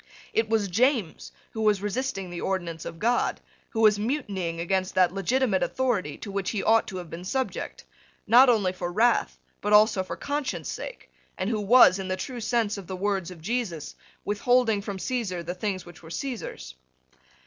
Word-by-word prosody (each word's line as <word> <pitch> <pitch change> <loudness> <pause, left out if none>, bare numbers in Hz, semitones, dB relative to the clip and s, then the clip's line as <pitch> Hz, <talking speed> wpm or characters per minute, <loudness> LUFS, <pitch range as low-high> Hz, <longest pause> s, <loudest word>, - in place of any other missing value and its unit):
It 225 -1 +1
was 220 -2 +2
James 225 - 0 0.2
who 220 - -5
was 210 -2 +2
resisting 205 -4 -2
the 175 - -5
ordinance 170 -4 -3
of 165 - -6
God, 240 +6 +1 0.3
who 225 - -2
was 210 -2 +5
mutinying 200 - -2
against 185 +2 -1
that 180 -1 +4
legitimate 210 +1 +1
authority 225 - -1
to 200 - -7
which 195 -1 -2
he 210 - -2
ought 225 0 +4
to 190 - -5
have 175 -3 -8
been 170 +2 -7
subject, 260 +7 -3 0.4
not 245 +5 +7
only 205 -6 +2
for 175 -1 -4
wrath, 230 +6 +2 0.2
but 210 +1 0
also 210 -2 +6
for - - -6
conscience 285 -1 -3
sake, - - -8 0.3
and 190 +5 -1
who 215 -2 -1
was, 205 -3 +7
in 190 - -4
the 185 0 -1
true 250 +1 -5
sense 220 -2 0
of 190 - -11
the 190 - -4
words 195 -2 -1
of 175 -3 -11
Jesus, 205 - -3 0.3
withholding 225 +1 +2
from 200 -1 -5
Caesar 190 -6 -2
the 175 +1 -4
things 185 0 -3
which 175 -2 -13
were 160 - -12
Caesar's. 170 - -5
205 Hz, 185 wpm, -26 LUFS, 185-235 Hz, 0.4 s, not